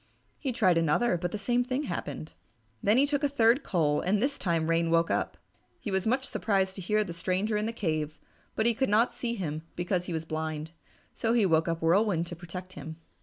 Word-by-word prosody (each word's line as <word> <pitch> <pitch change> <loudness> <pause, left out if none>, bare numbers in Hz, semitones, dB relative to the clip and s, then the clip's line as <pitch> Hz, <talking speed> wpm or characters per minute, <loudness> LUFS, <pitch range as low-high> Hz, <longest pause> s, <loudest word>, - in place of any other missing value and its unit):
He 270 - -1
tried 185 -8 +3
another, 165 +8 +2
but 175 0 -2
the - - -3
same 240 +4 +1
thing 255 +3 -2
happened. 155 - -5 0.5
Then 210 +4 +3
he 275 - +5
took 285 0 -1
a 285 - +3
third 240 0 +4
coal, 155 - +1
and 200 +3 +1
this 280 +5 0
time 165 -3 0
Rain 165 0 +1
woke 165 0 +3
up. - - -1 0.4
He 210 - -5
was 190 +2 0
much 260 +3 +1
surprised 195 -3 0
to 190 - -7
hear 210 +4 0
a 205 -5 0
stranger 185 +5 -1
in 210 +1 0
the - - -1
cave, 155 -8 -2 0.4
but 220 - +1
he 235 - +4
could 265 +2 0
not 225 +4 +3
see 240 -1 -3
him 155 -7 -3
because 180 0 -1
he 175 - -3
was 160 0 -3
blind. 155 0 -4 0.4
So 230 0 0
he 230 -4 +4
woke 160 -2 +3
up 165 -1 -2
Whirlwind 175 0 +3
to 175 - -7
protect 180 +2 -8
him. 155 +1 -7
190 Hz, 220 wpm, -29 LUFS, 165-230 Hz, 0.5 s, he